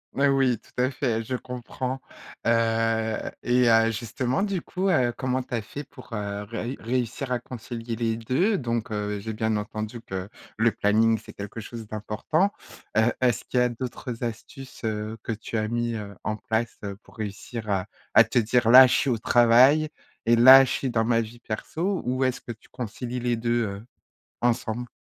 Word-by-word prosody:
Mais 140 +1 +3
oui, 135 -4 +2
tout 125 - -3
à 130 - +1
fait, 115 -4 -1
je 130 +3 -3
comprends. 125 +1 -5 0.5
Heu 115 -1 +2 0.2
et 125 0 +3
heu, 115 0 +5
justement 125 - -2
du 195 -4 -1
coup, 190 +4 -2
heu, 130 -8 +3
comment 130 -1 0
tu 125 - -5
as 115 - -1
fait 145 +7 -7
pour, 130 -4 -14
heu, 100 -1 -3
réu 115 +4 -4
réussir 125 +2 -2
à 125 - +1
concilier 120 -1 -6
les 115 -1 0
2? 175 - +1
Donc 115 -3 -2
heu, 105 -1 -2
j'ai 110 +2 -5
bien 110 0 0
entendu 110 +2 -5
que 95 -3 -6 0.3
le 115 +1 +3
planning, 110 +2 +3
c'est - - -12
quelque 105 +2 -7
chose 115 -1 -8
d'important, 110 - 0 0.4
heu, 110 +2 +4
est-ce 120 -4 +2
qu'il 125 - 0
y - - +5
a 125 - +2
d'autres 120 0 -6
astuces, 125 +3 -7
heu, 110 0 -3
que - - -3
tu 110 +1 -4
as 110 0 0
mis, 120 0 -1
heu, 105 -2 -6
en 110 - -1
place 115 +2 -2 0.2
pour - - -20
réussir 110 +2 -6
à 95 0 0 0.3
à - - +9
te - - -3
dire: 120 +1 +3
«Là, 130 +2 +11
je 130 - +1
suis 140 - +2
au 120 - +1
travail 125 +7 +5 0.4
et 120 - +6
là, 130 +3 +10
je 130 - -2
suis 135 - -1
dans 110 -1 +1
ma 115 -1 +3
vie 115 +2 -8
perso»? 170 - -3
Où 130 +1 0
est-ce 130 -1 0
que - - -8
tu 110 - -14
concilies 125 +1 -5
les 120 0 0
2, 120 +1 0
heu, 100 +2 -6 0.6
ensemble? 120 0 0
115 Hz, 195 wpm, -25 LUFS, 110-125 Hz, 0.6 s, Là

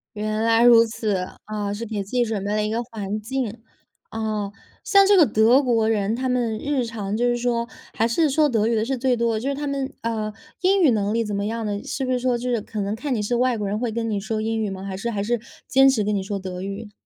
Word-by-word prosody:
原 215 +1 -2
来 230 0 +4
如 235 -1 +8
此， 220 -2 -2 0.3
啊， 210 -1 -3
是 220 +3 -5
给 210 -2 -3
自 195 - -12
己 250 -1 +2
准 215 -4 -3
备 205 - -1
了 215 - +1
一 210 - -1
个 230 +2 -1
环 210 -3 -4
境。 230 -1 -3 0.5
啊， 215 -2 -3 0.3
像 395 -5 +5
这 405 0 +6
个 345 - +8
德 230 +3 +4
国 230 -4 +2
人 210 -1 +1
他 260 +2 -2
们 240 -3 0
日 280 -1 -1
常 215 -3 -4
就 240 - 0
是 240 - +1
说 235 -1 0 0.3
还 225 - +2
是 300 +7 +2
说 300 +2 +3
德 225 -6 +1
语 230 - +1
的 220 -1 +1
是 265 +2 -2
最 250 0 +2
多 235 0 +1
的 215 - -1
就 260 - -2
是 280 - 0
他 290 +1 -4
们， 275 -1 -2
啊， 220 -2 -2 0.3
英 380 +1 +3
语 310 - +6
能 210 -2 0
力 230 0 +1
怎 210 -1 -4
么 200 +1 -1
样 225 +1 -3
的， 205 -1 -3
是 270 - -3
不 255 - -1
是 250 - +1
说 250 0 +1
就 250 +1 -3
是 235 -2 +1
可 210 0 -5
能 200 +1 -2
看 270 +4 -2
你 215 - -1
是 240 +4 0
外 250 0 +2
国 210 -2 -3
人 205 +2 -1
会 240 -1 -1
跟 225 0 -2
你 205 -2 -1
说 215 +2 -3
英 225 0 -1
语 215 - -1
吗？ 190 0 -6
还 195 -1 -5
是 235 - -3
还 205 -3 -2
是 235 +2 0 0.3
坚 270 +1 +5
持 240 -6 +2
跟 210 +1 0
你 195 - 0
说 200 +1 -3
德 185 -1 -6
语？ 200 +3 -6
225 Hz, 300 characters per minute, -23 LUFS, 210-245 Hz, 0.5 s, 如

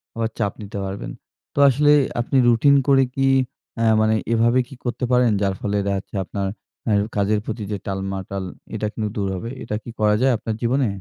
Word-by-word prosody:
আবার 115 -1 -1
চাপ 100 -3 0
নিতে 100 0 -7
পারবেন। 95 +1 -5 0.4
তো - - -2
আসলে 145 +3 +4 0.3
আপনি 135 +3 0
রুটিন 120 +5 +5
করে 135 -1 +5
কি 135 0 +2 0.5
অ্যা 115 - +1 0.2
মানে 110 0 +3 0.2
এভাবে 120 +2 +3
কি 135 - -11
করতে 120 +1 -1
পারেন? 125 -2 +4
যার 100 -1 +1
ফলে 105 0 -1
দেখা 100 - 0
যাচ্ছে 95 - -9
অ্যা 95 - 0
আপনার 100 +1 -3 0.7
কাজের 105 +1 +2
প্রতি 110 -1 -4
যে 105 - -1
টালমাটাল, 95 0 -4 0.3
এটা 105 0 -1
কিন্তু 105 -1 -2
দূর 100 -1 0
হবে। 115 +6 -5
এটা 105 - -3
কি - - -9
করা 105 0 +4
যায় 135 - +4
আপনার 110 +1 -4
জীবনে? 125 +1 +2
110 Hz, 195 wpm, -22 LUFS, 100-120 Hz, 0.7 s, রুটিন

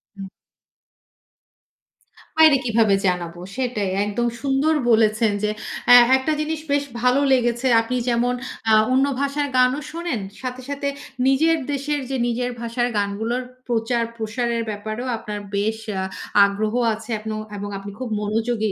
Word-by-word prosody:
হুম। 195 - -7 2.1
বাইরে 315 -2 +7
কিভাবে 220 -3 +3
জানাবো, 175 -1 -2 0.2
সেটাই। 240 -7 -1 0.2
একদম 235 +4 -1
সুন্দর 280 +3 +2 0.2
বলেছেন 220 -1 +3
যে, 210 - +2 0.4
এ - - +12 0.2
একটা 265 +4 -1
জিনিস 305 0 -2
বেশ 285 0 +2 0.2
ভালো 250 +2 +3
লেগেছে। 240 0 +1
আপনি 240 +3 -3
যেমন 240 +1 +1 0.4
আ - - +6 0.2
অন্য 265 +1 +4 0.2
ভাষার 285 +1 0
গানও 255 +3 +4
শোনেন। 335 - -3 0.2
সাথে 255 0 -5
সাথে 280 0 -3 0.4
নিজের 320 +5 +3
দেশের 290 +1 -1
যে 265 - -1
নিজের 245 +1 -1
ভাষার 235 +1 -1
গানগুলোর 220 +5 -1 0.2
প্রচার-প্রসারের 230 0 -1
ব্যাপারেও 215 +4 -5
আপনার 210 -1 -6 0.2
বেশ 215 +2 0 0.2
আ - - -1 0.4
আগ্রহ 210 +2 -1 0.2
আছে 225 +2 -9
এবং, 215 0 -4 0.2
এবং 205 - -5
আপন 195 - -5
আপনি 200 - -8
খুব 255 -3 -4
মনোযোগী 220 0 -1
235 Hz, 140 wpm, -22 LUFS, 215-265 Hz, 2.1 s, এ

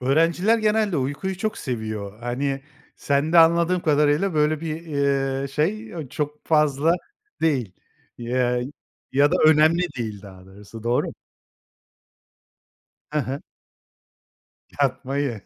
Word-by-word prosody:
Öğrenciler 165 - +3
genelde 215 -3 +1
uykuyu 145 +8 -2
çok 215 +1 -2
seviyor. 110 -4 -5
Hani 135 +3 -2 0.3
sende 145 +4 +2
anladığım 170 +2 +4
kadarıyla 150 +4 +2
böyle 150 0 +2
bir, 160 0 -4 0.6
eee, 140 - -3
şey, 190 +11 -1
eee, 160 -8 -7
çok 150 +2 -5
fazla 150 0 +3 0.5
değil, 130 - 0 0.5
eee, 125 0 0 0.5
ya 140 +2 +4
da - - +4
önemli 155 +3 +5 0.2
değil 105 -4 -4
daha 95 -2 -13
doğrusu. 105 +3 -12
Doğru? 120 +2 +1 2.1
He 150 - +2
he. 135 +1 -4 1.4
Yatmayı. 135 -3 -1
145 Hz, 110 wpm, -23 LUFS, 125-165 Hz, 2.1 s, önemli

